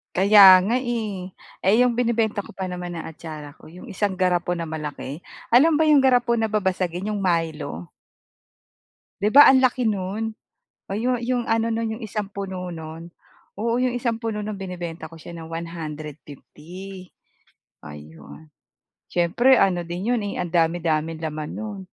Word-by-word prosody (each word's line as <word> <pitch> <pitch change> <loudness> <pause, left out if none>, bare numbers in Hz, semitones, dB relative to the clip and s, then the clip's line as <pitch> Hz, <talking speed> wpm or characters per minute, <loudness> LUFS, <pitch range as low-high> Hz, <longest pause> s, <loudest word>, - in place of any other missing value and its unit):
Kaya 195 -1 +8
nga, 220 +7 0
eh. 215 -7 -3 0.3
Eh, 195 +3 +4
yung 245 -2 +3
binebenta 225 -4 0
ko - - -12
pa 190 -1 -5
naman 180 -1 -5
na 165 - -6
atsara 155 -2 -9
ko - - -19
yung 175 +3 -12
isang 200 +1 -1
garapon 180 -2 0
na 165 - -4
malaki. 150 -1 -6 0.2
Alam 300 +6 +5
ba 310 - +4
yung 285 -3 +5
garapon 245 -2 +3
na 220 -1 -1
babasagin 185 -2 -1
yung 205 -2 -2
Milo? 160 - -2 1.3
'Di 205 - +2
ba, 290 - +10
ang 260 -1 +5
laki 255 -1 +2
no'n? 210 +3 -2 0.5
Oh, 195 - -5
yung, 245 +3 0
yung 245 -1 0
ano 225 0 +2
no'n 225 0 -2
yung - - -13
1 210 -1 -4
puno 190 -2 -5
no'n. 165 +1 -9 0.5
Oo, 230 +2 0
yung 250 -1 0
1 235 -2 -2
puno 210 -2 -3
no'n 210 -2 -5
binebenta 175 -4 -6
ko 165 - -12
siya 170 - -10
ng 165 -1 -9
150, 165 +3 -8 0.8
ayun, 75 - -12 0.6
siyempre 215 +10 +3
ano 175 -3 +2
din 180 +6 -4
'yon, 240 -3 +1
eh, 200 - -3
ang 175 -2 -5
dami-daming 165 -1 0
laman 155 -1 -4
no'n. 210 -3 -6
185 Hz, 160 wpm, -23 LUFS, 165-225 Hz, 1.3 s, ba